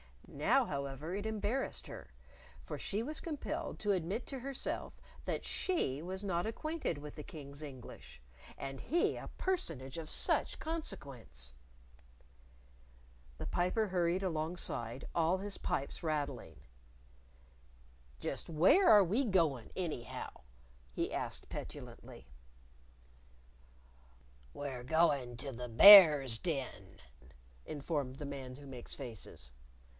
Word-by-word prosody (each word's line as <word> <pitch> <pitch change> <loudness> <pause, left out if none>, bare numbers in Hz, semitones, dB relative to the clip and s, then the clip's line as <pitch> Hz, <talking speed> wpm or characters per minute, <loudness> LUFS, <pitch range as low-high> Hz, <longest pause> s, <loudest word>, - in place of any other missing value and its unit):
Now, 240 - +2
however, 140 - -4
it 205 +2 -2
embarrassed 220 +5 -1
her, - - -9 0.5
for - - -6
she 210 +3 -1
was 305 +5 -1
compelled 310 -4 -4
to 210 - +1
admit 190 +5 -1
to 270 - -5
herself 270 +1 -4 0.3
that - - -2
she 150 - -1
was 190 +3 -5
not 185 -1 0
acquainted 310 - -2
with 145 0 -9
the 150 - -6
King's 145 -1 -9
English 130 - -10 0.4
and 135 -1 -6
he 335 +6 +1
a - - -7
personage 165 - -2
of 155 -1 -7
such - - +1
consequence! 140 - -5 1.8
The - - -5
Piper 180 +5 +1
hurried 180 +1 +1
alongside, 155 -8 -3
all 170 +2 +2
his 200 +1 -3
pipes 140 - -2
rattling. 145 - -3 1.6
"Just - - -4
where 180 - +5
are 210 -2 +9
we 210 +10 +1
goin', 165 - +1
anyhow?" 160 -10 -4 0.6
he - - -2
asked - - -3
petulantly. - - -8 2.3
"We're 135 -4 -5
going 140 -5 +2
to 135 +3 -2
the 125 0 -6
Bear's 145 - +10
Den," 135 - -4 0.7
informed 145 -3 -3
the 145 - -6
Man 135 -2 -6
Who 145 +1 -12
Makes 130 -3 -8
Faces. 110 - -9
155 Hz, 115 wpm, -34 LUFS, 135-200 Hz, 2.3 s, Bear's